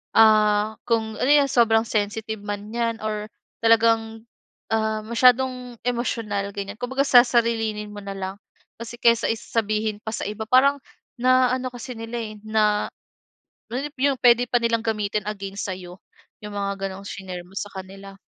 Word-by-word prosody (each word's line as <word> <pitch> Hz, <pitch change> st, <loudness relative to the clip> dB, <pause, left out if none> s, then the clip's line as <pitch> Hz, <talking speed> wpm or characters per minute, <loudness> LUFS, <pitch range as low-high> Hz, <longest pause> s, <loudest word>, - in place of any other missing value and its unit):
ah, 215 Hz, -1 st, +5 dB
kung 220 Hz, -2 st, 0 dB
ano 260 Hz, -, +1 dB
'yong 290 Hz, -1 st, +6 dB
sobrang 225 Hz, -2 st, +4 dB
sensitive 215 Hz, 0 st, -2 dB
man 205 Hz, 0 st, -5 dB
'yan 230 Hz, -1 st, -1 dB
or 210 Hz, -1 st, -3 dB, 0.4 s
talagang, 225 Hz, 0 st, +3 dB, 0.5 s
ah, 220 Hz, -1 st, +1 dB
masyadong 250 Hz, +1 st, +2 dB
emosyonal 225 Hz, -5 st, -2 dB
ganiyan. 200 Hz, 0 st, -5 dB
Kumbaga 260 Hz, +3 st, 0 dB
sasarilinin 230 Hz, -4 st, +3 dB
mo 205 Hz, -, -8 dB
na 200 Hz, -, -6 dB
lang, 190 Hz, 0 st, -5 dB, 0.4 s
kasi 235 Hz, +1 st, -8 dB
kaysa 235 Hz, -1 st, +4 dB
sabihin 215 Hz, -1 st, -2 dB
pa 220 Hz, -, -4 dB
sa -, -, -4 dB
iba 210 Hz, +1 st, -4 dB
parang 275 Hz, +3 st, +5 dB, 0.4 s
na 255 Hz, 0 st, +4 dB
ano 255 Hz, 0 st, -3 dB
kasi 245 Hz, +1 st, -7 dB
nila, 225 Hz, +1 st, -5 dB
eh, 215 Hz, -2 st, -6 dB
na 215 Hz, -1 st, +2 dB, 0.8 s
nap 280 Hz, +4 st, -4 dB
'yung 275 Hz, -1 st, +2 dB
puwede 245 Hz, -1 st, +5 dB
pa 245 Hz, -, +3 dB
nilang 230 Hz, -1 st, 0 dB
gamitin 210 Hz, -2 st, -1 dB
against 200 Hz, -1 st, -5 dB
sa'yo, 180 Hz, 0 st, -9 dB, 0.4 s
'yung 210 Hz, -, -7 dB
mga 200 Hz, -1 st, -3 dB
gano'ng 195 Hz, +1 st, -9 dB
shinare 185 Hz, -3 st, -7 dB
mo 190 Hz, -, -18 dB
sa 205 Hz, -, -4 dB
kanila. 195 Hz, +1 st, -10 dB
220 Hz, 155 wpm, -23 LUFS, 205-235 Hz, 0.8 s, yong